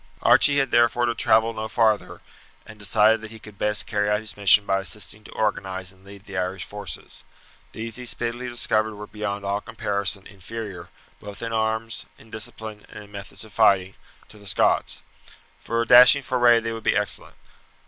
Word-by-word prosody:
Archie 145 -1 +5
had 135 -1 +1
therefore 120 +1 +3
to 120 - 0
travel 110 0 +2
no 110 0 -4
farther, 110 -2 0 0.4
and 105 0 -13
decided 105 +2 +3
that 110 - -8
he 115 - -10
could 105 -2 -14
best 105 0 +2
carry 105 -1 -1
out 105 - +2
his 110 0 -6
mission 100 0 +5
by 95 0 +1
assisting 105 +2 -4
to - - -13
organize 95 -3 -2
and 95 0 -23
lead 100 0 -14
the 100 - -10
Irish 90 0 -2
forces. 105 +3 -5 0.5
These 115 +1 -5
he 125 -1 -7
speedily 120 +2 -3
discovered 110 -2 +1
were 105 +1 -8
beyond 100 -1 -5
all 100 +1 -1
comparison 100 -3 -2
inferior, 100 -2 -8 0.3
both 105 +2 -9
in 115 0 -4
arms, 110 +1 -2
in 110 - -18
discipline, 110 -1 -6
and 105 - -10
in 105 - -17
methods 100 0 -9
of 110 - -17
fighting, 95 0 +3 0.4
to 105 - -15
the 100 - -10
Scots. - - +1 0.6
For 115 +1 -1
a - - -6
dashing 125 +3 +8
foray 120 -2 +4
they 115 0 -4
would 115 0 -6
be - - +1
excellent. - - -2
105 Hz, 190 wpm, -24 LUFS, 100-115 Hz, 0.6 s, dashing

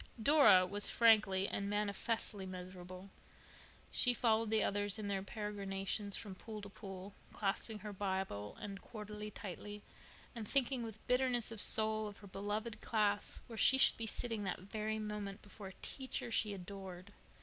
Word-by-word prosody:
Dora 220 -7 +7
was 205 +3 +4
frankly 210 -4 +5
and 200 0 -2
manifestly 205 0 -1
miserable. 185 +1 -8 0.8
She 245 -1 +3
followed 225 -1 +2
the 220 -1 +3
others 205 0 +1
in 215 -2 -4
their 195 -1 0
peregrinations 200 -1 -3
from 205 -4 -6
pool 215 +3 -7
to 200 - -7
pool, 195 -1 -8 0.2
clasping 210 +2 -1
her 210 - -4
Bible 190 - -2
and 200 -3 -6
quarterly 210 -1 -7
tightly 205 +1 -7 0.5
and 225 -4 -6
thinking 265 -1 +2
with 220 -2 -7
bitterness 250 -2 +2
of 225 -2 -4
soul 215 0 +3
of 205 0 -9
her 205 - -12
beloved 210 +3 -3
class 205 -2 0
where 230 - -9
she 265 - +6
should - - +6
be 225 - -2
sitting 225 -1 -2
that 190 - -2
very 215 +3 -3
moment, 210 -1 -4
before 205 0 -9
a 190 - -9
teacher 260 -3 -3
she 215 -2 +2
adored. 190 0 -8
205 Hz, 160 wpm, -37 LUFS, 195-220 Hz, 0.8 s, Dora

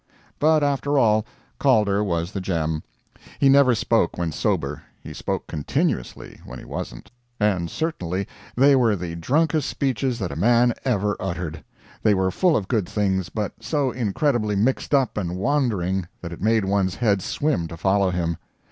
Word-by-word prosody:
But 155 0 +4
after 145 0 +1
all, 110 -3 +3 0.3
Calder 105 -7 +3
was 85 -2 -1
the 100 - -4
gem. 80 -4 -1 0.6
He 140 - +4
never 135 -3 +6
spoke 110 -4 +1
when 85 -2 -1
sober, 70 -1 -1 0.2
he - - -9
spoke - - -3
continuously 75 -3 -3
when - - -9
he - - -11
wasn't. - - -7 0.3
And 95 -5 +1
certainly 95 - -3 0.3
they 140 +3 +5
were 120 -5 +3
the 85 -2 -5
drunkest 150 - +1
speeches 130 -2 -1
that 95 -6 -3
a - - -5
man 120 +7 +3
ever 105 -5 +1
uttered. 85 -4 -4 0.4
They 105 -2 +4
were 95 0 +1
full 180 - +3
of 95 - -3
good 110 -8 0
things, 95 -4 0
but 105 0 -3
so 130 +4 0
incredibly 115 -1 0
mixed 130 +7 +1
up 130 -6 +1
and 90 -2 -3
wandering 95 - 0
that 85 -1 -6
it - - -10
made 110 0 +2
one's 95 -1 +1
head 105 -5 +1
swim 140 - -1
to 85 - -9
follow 95 +3 +2
him. 85 -2 -1
105 Hz, 165 wpm, -23 LUFS, 90-125 Hz, 0.6 s, never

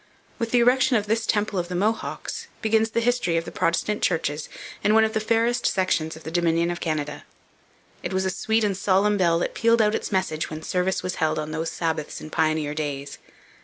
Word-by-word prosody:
With 230 - -1
the 245 +1 +3
erection 255 +2 +4
of 210 - -1
this 225 +1 0
temple 205 -2 +1
of 175 - -2
the 180 - -5
Mohawks 215 +5 -2 0.2
begins 220 0 +3
the 230 +1 0
history 240 -8 +1
of 165 - -1
the - - -7
Protestant 210 +5 0
churches 160 -4 -1 0.3
in 210 +1 +4
one 220 - +6
of 220 0 0
the - - +1
fairest 230 +2 +1
sections 170 -4 0
of 160 - -12
the 160 - -6
Dominion 170 0 +2
of 175 - -4
Canada. 150 -2 -3 0.8
It - - -4
was 190 0 0
a 190 - +1
sweet 220 +4 0
and 205 -2 +1
solemn 200 +2 +2
bell 170 -3 +3
that 170 - -2
pealed 230 0 +3
out 210 -1 +3
its - - -3
message 185 -5 -1
when 155 0 -7
service 180 +2 0
was 185 0 -3
held 155 -1 +2
on 155 0 -3
those 160 +1 -2
Sabbaths 160 -3 -3
in 155 - -9
pioneer 155 -2 +1
days. 145 -2 -4
185 Hz, 215 wpm, -24 LUFS, 160-220 Hz, 0.8 s, one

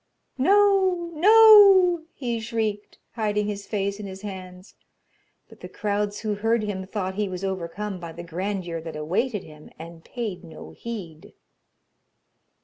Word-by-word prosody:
'No! 380 0 +3
no!' 390 -2 +7
he 240 -4 -3
shrieked, 220 -2 -3
hiding 210 -2 -1
his 205 -1 -5
face 200 -1 -2
in 205 - -6
his 190 +1 -10
hands; 185 -1 -9 0.7
but - - -17
the - - -9
crowds 205 0 -2
who 215 -2 -2
heard 225 +2 0
him 190 -3 -4
thought 190 -2 -3
he 205 0 -2
was 185 0 -6
overcome 190 +1 -4
by 170 -1 -8
the 170 +1 -9
grandeur 175 -1 -4
that 165 -1 -8
awaited 200 +8 -2
him, 150 -1 -14
and 165 0 -11
paid 215 -7 -6
no 160 -2 -11
heed. 200 -6 -9
205 Hz, 145 wpm, -24 LUFS, 185-235 Hz, 0.7 s, no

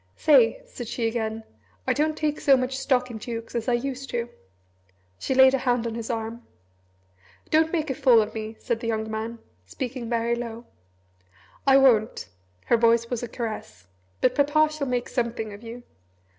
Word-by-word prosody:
"Say," 255 -7 +4
said 240 - -8
she 235 +1 -2
again, 225 -1 -3 0.4
"I - - +2
don't 305 +1 0
take 300 -1 -1
so 275 -2 +5
much 255 +1 -2
stock 255 -2 0
in 220 - -7
dukes 230 0 -6
as 235 -1 -3
I 245 - +2
used 270 +2 -3
to." 240 0 -2 0.9
She 265 - -1
laid 265 0 +7
a 270 - +2
hand 245 -2 0
on 230 - -3
his 230 -1 -5
arm. 225 0 -4 1.1
"Don't 320 +1 +3
make 315 -4 -1
a - - 0
fool 255 -4 +5
of 215 - -1
me," 220 0 -5
said 235 -2 -2
the 230 - -5
young 220 -1 -2
man, 220 +2 -4 0.3
speaking 245 - -5
very 235 0 +1
low. 235 0 -6 1.0
"I 270 0 +7
won't," 235 -5 +3 0.4
her 235 - +3
voice 230 0 +3
was 245 - -2
a 240 - -4
caress, 215 - -6 0.3
"but 255 - +3
Papa 300 +2 +3
shall 295 -2 -3
make 245 -1 -1
Something 230 -3 -3
of 205 - -11
you. 235 +1 -9
240 Hz, 185 wpm, -25 LUFS, 225-265 Hz, 1.1 s, laid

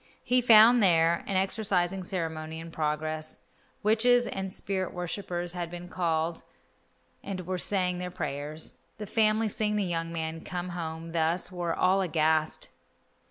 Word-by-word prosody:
He 250 0 +3
found 235 0 +8
there 170 -3 +4
an 195 - -2
exorcising 190 -2 0
ceremony 160 -4 -4
in 165 0 -8
progress. 155 0 -2 0.5
Witches 240 +3 +4
and 190 0 -4
spirit 190 -1 -3
worshippers 175 -1 -4
had 175 -2 -4
been 175 +1 -8
called 165 -2 -1 0.8
and 185 -3 -5
were 185 0 -2
saying 180 -2 +1
their 180 0 -3
prayers. 150 -2 -4 0.2
The 210 - -5
family, 215 +1 +2
seeing 210 0 -1
the 210 - +1
young 165 -2 -2
man 160 -1 -4
come 180 0 -4
home 165 -1 -5
thus, 165 +3 0
were 175 -2 -2
all 190 +1 +3
aghast. 160 -2 +1
175 Hz, 145 wpm, -28 LUFS, 165-195 Hz, 0.8 s, found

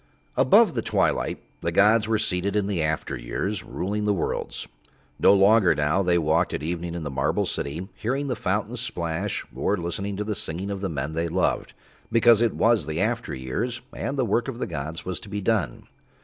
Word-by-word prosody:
Above - - +5
the - - -1
Twilight - - 0 0.2
the 85 - -1
gods 105 +4 +4
were 110 -1 +2
seated 100 -1 -1
in 105 -2 +2
the 100 -4 -1
after 80 0 -1
years, 90 - -3
ruling 105 +4 -3
the 105 -1 +2
worlds. 85 - -3 0.5
No - - +6
longer 100 0 +5
now 75 +6 +2
They 90 -2 +3
walked 80 +1 +1
at 75 - -5
evening 85 +1 -3
in 85 - -4
the 75 - -4
Marble 65 - 0
City 80 +7 -3
hearing 135 +5 -2
the 125 - -1
fountains 105 +4 -2
splash, 85 -9 -3
or 105 - 0
listening 95 +3 -3
to 105 - -1
the 105 0 -2
singing 95 +2 -3
of 100 -1 -4
the 95 - -1
men 75 -1 -3
they 85 +1 -1
loved, 90 +2 0 0.4
because 115 -1 +5
it 120 - +2
was 115 -7 +3
in - - -7
the - - -1
after 115 - -1
years 110 - -3
and 135 +4 -3
the 130 - +2
work 120 +1 +1
of 130 -3 -4
the - - -2
gods 80 +1 -5
was 90 -1 -3
to 105 - -12
be 105 0 -3
done. 105 0 0
95 Hz, 205 wpm, -25 LUFS, 85-110 Hz, 0.5 s, No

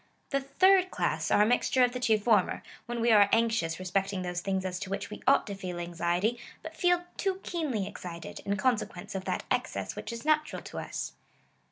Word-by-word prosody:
The 275 -1 +1 0.2
thii 380 0 +7
d 370 - -9
class - - -1
are 210 - +5
a - - +4
mixture 245 +2 +3
of 245 - +3
the 250 - -4
two 230 -3 +3
former; 210 -3 +2 0.2
when 240 -1 -3
we 235 0 +4
are 205 -2 +7
anxious 225 -8 +2
respecting 190 +1 -1
those 175 0 -3
things 190 0 -1
as 185 -1 -3
to 190 - -5
which 200 +1 -4
we 210 - -7
ought 275 - +5
to 205 - -5
feel 185 -3 -5
anxiety, 175 +6 -1 0.2
but - - -8
feel 355 -1 +2
too 385 -1 -1
keenly 290 - -2
excited, 170 -3 -7
in 200 0 -2
consequence 220 -6 -1
of 190 -1 -4
that - - -2
excess - - -1
which - - -6
is 230 +4 -7
natural 305 0 +1
to - - -6
us. - - -5
210 Hz, 210 wpm, -29 LUFS, 185-250 Hz, 0.2 s, thii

